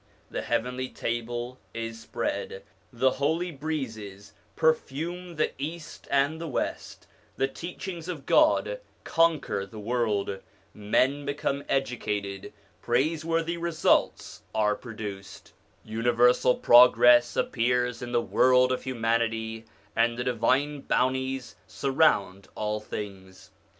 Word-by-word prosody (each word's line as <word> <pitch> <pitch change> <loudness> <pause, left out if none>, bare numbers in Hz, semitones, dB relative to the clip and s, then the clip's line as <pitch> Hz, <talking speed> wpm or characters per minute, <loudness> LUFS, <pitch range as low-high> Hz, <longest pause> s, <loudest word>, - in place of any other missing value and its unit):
The - - -3
heavenly 125 +2 -2
table 120 +2 -4 0.2
is 115 0 -5
spread, 465 - -4 0.3
the 130 +1 +2
holy 160 +7 -1
breezes 110 -10 -5 0.2
perfume 165 +3 -1
the 155 - 0
East 160 +3 -7
and 140 +4 +1
the 165 - -4
West, 140 - -4 0.3
the 135 - +2
teachings 175 +2 -7
of 160 -7 -6
God 315 +11 +3 0.2
conquer 160 -11 +1
the 105 +3 -11
world, 105 -3 -1 0.3
men 130 +7 +1
become 140 0 -2
educated, 105 -7 -2 0.3
praiseworthy 165 +6 0
results 170 -1 +1
are 105 -1 +3
produced, 105 -5 -8 0.3
universal 120 +3 +3
progress 120 0 +6
appears 125 0 0
in 120 0 -5
the 120 -1 +2
world 125 0 +4
of 130 - -1
humanity, 115 -2 -1 0.3
and 115 +1 +2
the 125 - -2
divine 130 +4 +1
bounties 130 0 -1
surround 130 -9 +1
all 105 0 -2
things. 95 -4 -8
125 Hz, 110 wpm, -27 LUFS, 115-150 Hz, 0.3 s, progress